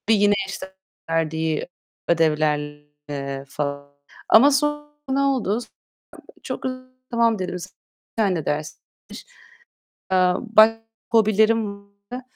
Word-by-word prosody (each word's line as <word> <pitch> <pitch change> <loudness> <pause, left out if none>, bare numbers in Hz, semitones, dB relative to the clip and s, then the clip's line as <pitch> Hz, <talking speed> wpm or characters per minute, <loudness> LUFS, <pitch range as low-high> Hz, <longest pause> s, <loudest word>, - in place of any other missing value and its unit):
Bir 225 - +6
yine 205 0 +4
işte 190 -1 -8 0.3
verdiği 160 -1 -1 0.4
ödevlerle 145 -3 -1
falan. 140 0 -4 0.4
Ama 270 +6 +7
sonra 295 +1 0 0.2
ne 265 +1 +1
oldu? 255 -6 +1 0.8
Çok - - -5
hızlı 255 0 -5 0.2
tamam 230 -2 +2
dedim. 180 -1 -3
Bir 180 +1 -13
tane 180 -6 0
ders. 150 +1 -3 1.3
Eee, 185 -1 +4
başka 225 -1 +4 0.3
hobilerim 215 -1 +2 0.3
var. 250 +1 -5
190 Hz, 100 wpm, -23 LUFS, 150-225 Hz, 1.3 s, Ama